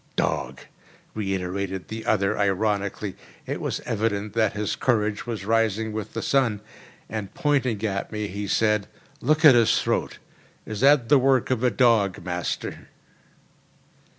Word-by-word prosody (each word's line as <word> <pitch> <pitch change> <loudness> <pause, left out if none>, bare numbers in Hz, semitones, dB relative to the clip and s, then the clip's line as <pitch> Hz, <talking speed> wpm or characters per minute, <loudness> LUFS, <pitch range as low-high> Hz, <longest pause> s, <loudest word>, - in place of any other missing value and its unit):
"Dog!" - - -1 0.5
reiterated 95 -2 -3
the 110 0 -6
other 100 -2 +2
ironically. 100 0 -1 0.3
It - - -4
was - - -3
evident 105 -1 -2
that 110 -3 +1
his 105 0 -2
courage 110 -3 0
was 110 -5 -4
rising 110 0 +1
with 105 -1 -5
the - - -3
sun; 115 -7 +1 0.5
and, 105 -3 -5
pointing 135 -6 +1
to 100 -2 -2
me, 105 -1 -3
he 100 +1 -5
said, 105 0 +1 0.3
"Look 155 +5 +2
at 145 - +10
his 120 -2 +4
throat. - - -1 0.5
Is 110 -2 -5
that 135 -3 +4
the 145 -1 +6
work 130 -1 +2
of 125 -1 0
a 125 - +4
dog, 110 -4 +2
master?" 90 -1 -4
110 Hz, 145 wpm, -24 LUFS, 100-115 Hz, 0.5 s, at